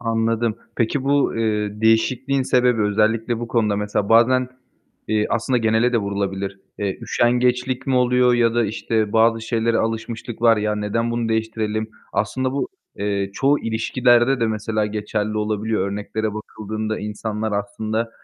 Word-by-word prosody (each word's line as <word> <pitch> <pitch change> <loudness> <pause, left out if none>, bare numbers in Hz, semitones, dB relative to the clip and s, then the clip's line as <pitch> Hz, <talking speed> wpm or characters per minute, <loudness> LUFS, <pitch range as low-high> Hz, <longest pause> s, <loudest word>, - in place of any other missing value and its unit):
Anladım. 115 -1 0 0.2
Peki, 125 +4 0
bu, 140 -2 +2
eee, 105 -2 -1
değişikliğin 130 +4 +2
sebebi, 125 -3 +2
özellikle 110 +3 +1
bu 120 - -5
konuda 110 -3 +1
mesela 105 0 -1
bazen, 125 +3 +4 0.6
eee, 105 -1 +1
aslında 120 +2 +1
genele 115 +2 +2
de 120 - +3
vurulabilir. 100 -1 -3 0.2
Eee, 100 -2 -2
üşengeçlik 125 +2 +1
mi 135 - +1
oluyor 125 0 +4
ya 115 -1 +2
da, 120 -1 +2
işte, 110 0 -1
bazı 115 0 +4
şeylere 115 0 0
alışmışlık 115 +1 -4
var. 115 -1 +6
Ya, 105 0 0
neden 110 +3 -1
bunu 120 -1 -1
değiştirelim? 110 -1 -2 0.2
Aslında 130 +5 -1
bu, 140 - -2 0.3
eee, 100 -1 -1
çoğu 140 +6 +2
ilişkilerde 120 +3 +2
de 115 - +2
mesela 110 0 -1
geçerli 105 0 -3
olabiliyor. 105 -1 -1
Örneklere 105 +1 -3
bakıldığında 110 0 -4
insanlar 105 +1 -4
aslında 110 +3 -2
110 Hz, 145 wpm, -21 LUFS, 105-120 Hz, 0.6 s, var